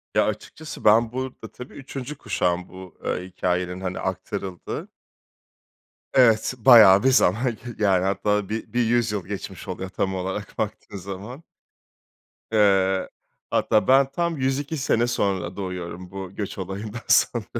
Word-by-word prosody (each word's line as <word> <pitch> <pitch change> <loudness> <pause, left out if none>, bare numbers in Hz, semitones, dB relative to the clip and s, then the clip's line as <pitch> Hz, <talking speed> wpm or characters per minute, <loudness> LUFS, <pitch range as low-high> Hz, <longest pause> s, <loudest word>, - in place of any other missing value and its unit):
Ya - - +4
açıkçası 110 +9 -6
ben 110 +2 +5
burada, 130 +1 -6
tabii, 125 - -11
3. 135 +1 -7
kuşağım 90 -7 -1
bu, 95 -1 -12
eee, 90 - -2
hikâyenin 90 0 -2
hani 90 -1 -3
aktarıldığı. 95 -2 -5 1.3
Evet, 115 -3 +4
bayağı 110 -6 +8
bir 135 - +5
zaman 95 -8 +4 0.2
g 110 - -10 0.3
yani 95 -3 +3
hatta 100 +1 0
bir 110 +2 -5
bir 120 -1 +2
100 120 -1 +2
yıl 100 -4 -3
geçmiş 100 -2 -7
oluyor 95 +1 -5
tam 95 0 -2
olarak 95 +2 -5
baktığın 105 -1 -4
zaman. 100 - -8 1.1
Eee, 95 -3 +3 0.4
hatta 110 -1 +2
ben 135 +1 +5
tam 170 +1 -1
102 140 +3 -1
sene 120 -4 +1
sonra 95 -6 -1
doğuyorum 90 -2 -6
bu 95 -1 -7
göç 100 -2 -5
olayından 100 +4 -5
sonra. 115 -4 +3
105 Hz, 140 wpm, -24 LUFS, 95-120 Hz, 1.3 s, bayağı